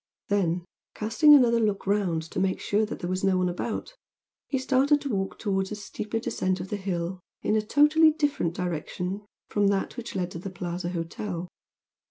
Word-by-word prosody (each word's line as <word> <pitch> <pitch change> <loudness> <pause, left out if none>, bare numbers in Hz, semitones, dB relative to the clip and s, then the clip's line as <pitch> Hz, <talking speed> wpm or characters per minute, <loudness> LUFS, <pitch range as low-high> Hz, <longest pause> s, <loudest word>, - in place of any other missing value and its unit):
Then, 180 -4 +1 0.3
casting 230 +8 +6
another 235 -4 +5
look 210 -3 0
round 190 -5 +1
to - - -2
make 190 0 +1
sure 210 +1 +1
that - - -5
there 175 - -2
was 185 +1 -2
no 190 -1 +3
one 185 0 +2
about, 220 - -4 0.5
he 270 - 0
started 270 +3 +3
to 280 - -4
walk 195 -1 -2
towards 190 -2 -1
a - - -2
steeper 210 +1 -4
descent 185 -4 -1
of 190 - -6
the - - -1
hill 185 -2 -3 0.2
in 215 - +2
a 215 - +3
totally 300 +8 +5
different 290 - 0
direction 180 +3 -3 0.3
from 205 -1 +2
that 200 +4 0
which 240 -3 -6
led 180 -1 -1
to 165 - -6
the 195 - -5
"Plaza" 175 -1 -4
hotel. 175 +1 -4
195 Hz, 190 wpm, -27 LUFS, 180-225 Hz, 0.5 s, casting